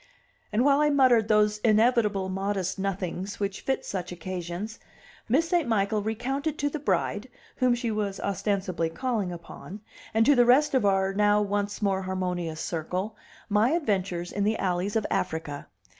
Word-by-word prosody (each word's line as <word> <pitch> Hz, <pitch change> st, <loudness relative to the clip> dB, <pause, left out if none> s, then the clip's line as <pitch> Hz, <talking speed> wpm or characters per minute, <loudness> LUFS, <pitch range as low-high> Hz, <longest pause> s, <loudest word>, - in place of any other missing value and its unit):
And 220 Hz, +5 st, +2 dB
while 280 Hz, 0 st, +5 dB
I 300 Hz, 0 st, +4 dB
muttered 255 Hz, -6 st, +4 dB
those 210 Hz, -1 st, +3 dB
inevitable 215 Hz, -3 st, +3 dB
modest 195 Hz, 0 st, -2 dB
nothings 195 Hz, 0 st, -3 dB
which 200 Hz, -1 st, -3 dB
fit 265 Hz, -, -1 dB
such 180 Hz, -2 st, -4 dB
occasions, 180 Hz, +4 st, -5 dB, 0.5 s
Miss 300 Hz, +8 st, +3 dB
St. 345 Hz, -5 st, +1 dB
Michael 210 Hz, -1 st, +1 dB
recounted 270 Hz, +8 st, -2 dB
to 290 Hz, 0 st, -1 dB
the 305 Hz, -, -3 dB
bride, 205 Hz, -, -1 dB, 0.3 s
whom 250 Hz, -1 st, +3 dB
she 240 Hz, -1 st, -2 dB
was 205 Hz, -2 st, -2 dB
ostensibly 190 Hz, -4 st, -1 dB
calling 220 Hz, -1 st, -2 dB
upon, 175 Hz, +4 st, -9 dB, 0.3 s
and 225 Hz, +1 st, +3 dB
to 290 Hz, -, +6 dB
the 245 Hz, -3 st, +5 dB
rest 275 Hz, +5 st, +4 dB
of 255 Hz, -6 st, +3 dB
our 195 Hz, 0 st, +2 dB
now 205 Hz, +1 st, +3 dB
once 205 Hz, 0 st, -2 dB
more 195 Hz, -1 st, +1 dB
harmonious 180 Hz, -4 st, -3 dB
circle, 185 Hz, +6 st, -3 dB, 0.3 s
my 215 Hz, +7 st, +3 dB
adventures 190 Hz, -, -1 dB
in 200 Hz, -, -1 dB
the 215 Hz, +2 st, +1 dB
alleys 185 Hz, +2 st, -1 dB
of 220 Hz, -, +1 dB
Africa. 150 Hz, -3 st, -2 dB
205 Hz, 160 wpm, -27 LUFS, 185-235 Hz, 0.5 s, to